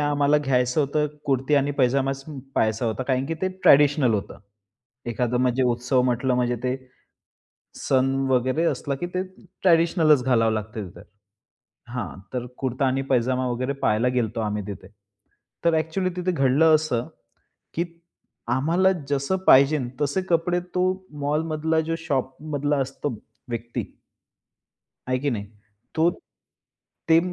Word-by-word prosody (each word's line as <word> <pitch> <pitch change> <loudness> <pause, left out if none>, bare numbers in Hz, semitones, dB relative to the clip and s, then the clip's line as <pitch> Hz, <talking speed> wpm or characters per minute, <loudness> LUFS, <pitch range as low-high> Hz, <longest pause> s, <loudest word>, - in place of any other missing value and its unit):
आम्हाला 145 0 +3
घ्यायचं 125 -1 +1
होतं 150 +1 +1 0.2
कुर्ती 135 0 +1
आणि 140 0 +2
पैजामा 135 +1 +2
सम 135 +1 -9 0.2
पहायचा 110 +2 +1
होता 115 +3 -2
कारण 130 0 0
की, 165 - -2
ते 185 +4 -2
ट्रेडिशनल 145 -8 +4
होतं. 100 - -4 0.7
एखादं 120 +1 -1
म्हणजे 130 +1 +2
उत्सव 125 +2 +1
म्हटलं 125 +1 +1
म्हणजे 125 -1 +1
ते, 125 +1 0 1.0
सण 135 0 +1 0.2
वगैरे 130 +5 +2
असला, 145 -3 -1
की 175 +6 -4
ते 185 - +1 0.4
ट्रेडिशनलचं 165 -5 +4
घालावं 115 -3 +3
लागतं 110 -1 -4
तिथं. 90 - -14 0.9
हां, 120 -5 -4 0.2
तर 125 -1 -2
कुर्ता 130 +1 -1
आणि 135 +1 0
पैजामा 130 0 +1
वगैरे 130 +3 -1
पहायला 115 0 +2
गेलतो 115 -1 -1
आम्ही 105 -1 -2
तिथे. 100 -2 -8 0.8
तर 170 -1 +4
एक्चुअली 160 +4 0
तिथे 180 0 -1
घडलं 155 +2 +4
असं, 135 -7 -2 0.7
की 170 - 0 0.7
आम्हाला 170 +7 +3 0.2
जसं 140 +7 0
पाहिजेनं 135 -1 +6
तसे 145 +6 +1
कपडे 175 +1 +2 0.2
तो 180 - +2 0.4
मॉलमधला 155 +2 0
जो 165 +1 -2
शॉपमधला 145 0 -2
असतो 135 +2 -3 0.4
व्यक्ती 120 0 -4 1.3
आहे 130 - +2
की 145 +2 0
नाही? 105 -6 -3 0.5
तो 165 +2 +4 1.0
ते 160 - +7
135 Hz, 135 wpm, -24 LUFS, 125-155 Hz, 1.3 s, ते